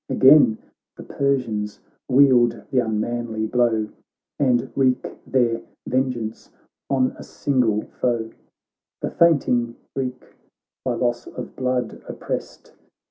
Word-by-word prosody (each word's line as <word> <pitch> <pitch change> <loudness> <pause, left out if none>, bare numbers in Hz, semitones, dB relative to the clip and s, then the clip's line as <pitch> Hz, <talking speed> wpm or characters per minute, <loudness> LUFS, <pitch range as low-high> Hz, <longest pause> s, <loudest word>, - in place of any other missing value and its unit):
Again 130 -5 +6 0.4
the - - -8
Persians 115 -7 -1 0.3
wield 125 -4 +5
the 130 - +3
unmanly 110 0 -1
blow 120 +2 +3 0.2
■ 105 - -16 0.5
And 125 -4 +2
wreak 130 -2 +2 0.2
their 120 -3 +1 0.2
vengeance 125 -4 -2 0.4
on 130 -2 +2
a - - -7
single 125 -7 0
foe; 115 -3 -2 0.7
The - - -2
fainting 125 -8 +3 0.2
Greek, 130 -2 -3 0.6
by 125 -2 -1
loss 120 0 -1
of - - -8
blood 125 -3 -2
opprest. - - -6
125 Hz, 110 wpm, -22 LUFS, 115-130 Hz, 0.7 s, Again